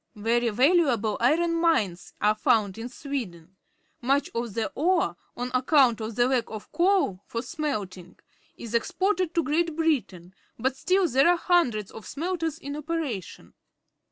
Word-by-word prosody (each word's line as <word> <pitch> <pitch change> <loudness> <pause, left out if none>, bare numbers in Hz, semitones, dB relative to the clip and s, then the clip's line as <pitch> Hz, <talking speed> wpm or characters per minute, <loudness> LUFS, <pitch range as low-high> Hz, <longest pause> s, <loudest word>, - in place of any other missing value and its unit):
Very 230 +3 +1
valuable 250 - +2
iron_mines. 325 - +1
are 210 +1 +3
found 215 -2 +1
in 235 +2 -5
Sweden. 195 - -6 0.5
Much 275 +3 +1
of 235 -3 -4
the 225 -2 -1
ore, 335 - +1 0.2
on 245 +1 -3
account 255 -3 +3
of 220 0 -5
the 240 +1 +3
lack 255 -3 +1
of 215 -1 -9
coal 350 - +2
for 230 0 -4
smelting, 210 - -5 0.4
is 235 -1 -8
exported 370 - 0
to 335 - +2
Great 325 +2 0
Biikiin, 230 - -1 0.2
but 260 +3 -1
still 370 +6 +2
there 270 +1 +3
are 350 - +4
hundreds 255 - +1
of 220 - -10
smelters 330 0 -3
in 285 -3 -7
operation. 300 - -5
255 Hz, 145 wpm, -26 LUFS, 220-330 Hz, 0.5 s, are